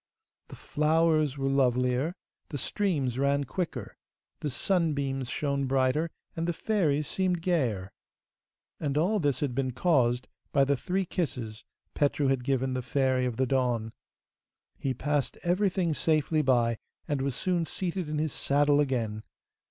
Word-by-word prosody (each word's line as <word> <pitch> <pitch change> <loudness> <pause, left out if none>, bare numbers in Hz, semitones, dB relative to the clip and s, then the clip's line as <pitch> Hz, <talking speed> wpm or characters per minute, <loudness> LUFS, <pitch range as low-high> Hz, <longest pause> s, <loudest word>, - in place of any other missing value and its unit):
The - - -10
flowers 155 -1 +2
were 135 0 -1
lovelier, 130 +3 +2 0.3
the 145 - -4
streams 140 - -1
ran 140 +1 +2
quicker, 140 - -4 0.4
the 150 - -2
sunbeams 140 -5 0
shone 140 -1 -1
brighter, 135 +5 +2 0.3
and 165 +1 -2
the 175 - +1
fairies 160 -7 +1
seemed 180 -3 0
gayer. 120 - 0 0.9
And 145 -1 -1
all 195 +7 +2
this 145 -6 0
had 140 -4 0
been 130 0 -1
caused 125 -5 +2 0.2
by 140 - +4
the 140 +1 +2
three 185 +8 -1
kisses 125 - -3 0.3
Petru 145 -1 +1
had 135 -2 +1
given 130 -1 0
the 130 - -1
Fairy 130 0 +1
of 120 - -4
the 130 - +2
Dawn. 120 -4 0 0.9
He 130 -2 -1
passed 145 +1 -1
everything 180 -1 +1
safely 155 0 +2
by, 120 -4 +2 0.3
and 145 -2 -1
was 135 -2 -1
soon 175 +1 0
seated 180 -3 -3
in 150 - -2
his 155 0 -1
saddle 145 +1 +3
again. 115 -7 0
140 Hz, 145 wpm, -29 LUFS, 130-160 Hz, 0.9 s, by